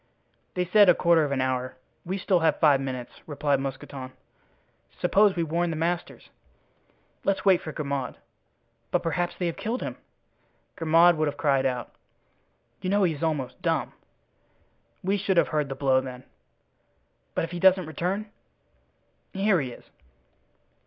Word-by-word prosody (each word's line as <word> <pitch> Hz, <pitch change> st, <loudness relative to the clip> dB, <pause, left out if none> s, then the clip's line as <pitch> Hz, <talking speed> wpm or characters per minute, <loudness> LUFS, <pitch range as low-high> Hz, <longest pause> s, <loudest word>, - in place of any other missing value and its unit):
"They 180 Hz, 0 st, 0 dB
said 205 Hz, +2 st, +6 dB
a 175 Hz, -, +7 dB
quarter 170 Hz, -2 st, +4 dB
of 145 Hz, -, -4 dB
an 135 Hz, -2 st, 0 dB
hour. 130 Hz, 0 st, -2 dB, 0.3 s
We 185 Hz, +3 st, -2 dB
still 190 Hz, -1 st, +2 dB
have 160 Hz, -1 st, +2 dB
five 145 Hz, -4 st, +5 dB
minutes," 130 Hz, -2 st, -5 dB, 0.2 s
replied 145 Hz, -2 st, 0 dB
Mousqueton. 135 Hz, -1 st, -6 dB, 0.9 s
"Suppose 205 Hz, -1 st, +4 dB
we 170 Hz, -, 0 dB
warn 170 Hz, +2 st, 0 dB
the 165 Hz, -, -2 dB
masters." 170 Hz, +2 st, -3 dB, 0.9 s
"Let's 195 Hz, 0 st, 0 dB
wait 190 Hz, -3 st, +5 dB
for 155 Hz, -, -6 dB
Grimaud." 140 Hz, -4 st, -3 dB, 0.7 s
"But -, -, 0 dB
perhaps 175 Hz, +1 st, -1 dB
they 180 Hz, -, -2 dB
have 170 Hz, -, -2 dB
killed 235 Hz, +4 st, -3 dB
him." -, -, -5 dB, 0.8 s
"Grimaud 165 Hz, +1 st, +5 dB
would 155 Hz, 0 st, +1 dB
have 145 Hz, 0 st, -3 dB
cried 135 Hz, -2 st, +2 dB
out." 125 Hz, -1 st, -4 dB, 0.9 s
"You 185 Hz, -, -2 dB
know 200 Hz, +1 st, +3 dB
he 170 Hz, -3 st, +2 dB
is 145 Hz, -, -9 dB
almost 150 Hz, -6 st, -2 dB
dumb." -, -, -1 dB, 1.1 s
"We 195 Hz, +2 st, +1 dB
should 190 Hz, -1 st, 0 dB
have -, -, +4 dB
heard 150 Hz, -3 st, -1 dB
the 135 Hz, -, -4 dB
blow, 135 Hz, -1 st, +2 dB
then." 130 Hz, -1 st, -8 dB, 1.1 s
"But -, -, 0 dB
if 165 Hz, -, -4 dB
he 175 Hz, -, -4 dB
doesn't 185 Hz, 0 st, +5 dB
return?" 180 Hz, +6 st, -2 dB, 1.1 s
"Here 195 Hz, -3 st, +2 dB
he 130 Hz, -, -4 dB
is." -, -, -12 dB
165 Hz, 160 wpm, -26 LUFS, 140-180 Hz, 1.1 s, a